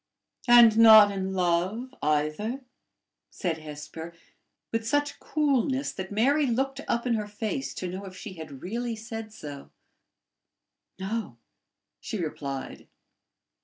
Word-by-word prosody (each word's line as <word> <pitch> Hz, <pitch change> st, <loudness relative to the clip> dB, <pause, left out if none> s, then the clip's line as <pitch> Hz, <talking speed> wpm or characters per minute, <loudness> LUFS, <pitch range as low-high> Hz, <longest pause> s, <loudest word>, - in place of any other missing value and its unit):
"And 235 Hz, -2 st, +8 dB
not 220 Hz, -2 st, +9 dB
in 190 Hz, -1 st, -3 dB
love 185 Hz, +8 st, 0 dB
either?" 155 Hz, -, 0 dB, 0.7 s
said 165 Hz, -3 st, -3 dB
Hesper 155 Hz, +2 st, -8 dB, 0.6 s
with 225 Hz, 0 st, -2 dB
such 290 Hz, +3 st, 0 dB
coolness 275 Hz, -2 st, 0 dB
that 190 Hz, 0 st, -7 dB
Mary 275 Hz, +8 st, +3 dB
looked 270 Hz, +3 st, -1 dB
up 235 Hz, +1 st, 0 dB
in 245 Hz, -, +1 dB
her 210 Hz, -2 st, -1 dB
face 220 Hz, +5 st, -3 dB
to 185 Hz, -, -4 dB
know 185 Hz, +3 st, -6 dB
if 185 Hz, -1 st, -10 dB
she 200 Hz, +1 st, -8 dB
had 155 Hz, -6 st, -10 dB
really 235 Hz, +4 st, -3 dB
said 225 Hz, 0 st, -7 dB
so. 145 Hz, -9 st, -9 dB, 1.3 s
"No," 195 Hz, -, -4 dB, 0.6 s
she -, -, -5 dB
replied. 140 Hz, -5 st, -5 dB
215 Hz, 125 wpm, -27 LUFS, 175-235 Hz, 1.3 s, not